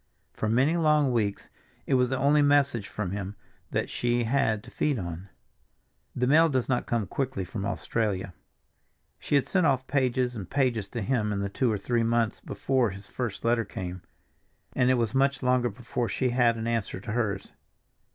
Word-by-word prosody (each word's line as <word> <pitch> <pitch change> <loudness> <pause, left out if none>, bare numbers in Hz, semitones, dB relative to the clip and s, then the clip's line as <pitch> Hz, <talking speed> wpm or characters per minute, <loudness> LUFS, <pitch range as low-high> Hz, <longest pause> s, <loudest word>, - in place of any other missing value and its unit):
For 110 - -2
many 135 +9 +3
long 150 -4 +3
weeks 105 -4 -1 0.4
it - - -1
was 125 -1 +3
the 130 - -1
only 145 +3 +4
message 145 -7 +3
from 105 -3 -4
him 100 0 -4 0.3
that - - -1
she 120 0 0
had 110 -3 +1
to 125 - -13
feed 145 -1 0
on. 90 0 -6 0.9
The 125 - +1
mail 160 +5 +5
does 130 -4 0
not 125 -2 0
come 115 -3 0
quickly 125 -2 -3
from 100 +2 -4
Australia. 95 +1 -2 0.9
She - - -1
had 140 - +3
sent 185 -4 +2
off 130 -2 +1
pages 130 -2 0
and 100 -5 -7
pages 125 -7 0
to 120 -1 -4
him 105 -2 0
in 100 - -1
the 100 0 -2
two 120 +4 +1
or 105 - 0
three 120 +4 0
months 115 -1 +1
before 130 -4 0
his 95 +1 -9
first 115 +1 -5
letter 115 0 +3
came, 95 -4 -6 0.7
and 125 -1 +3
it 130 - +5
was 115 -2 0
much 135 0 +2
longer 125 -1 +2
before 120 +2 -3
she 130 - 0
had 120 -1 +3
an 115 - -4
answer 115 -5 -2
to 105 - -6
hers. 105 -4 -2
120 Hz, 190 wpm, -27 LUFS, 105-130 Hz, 0.9 s, mail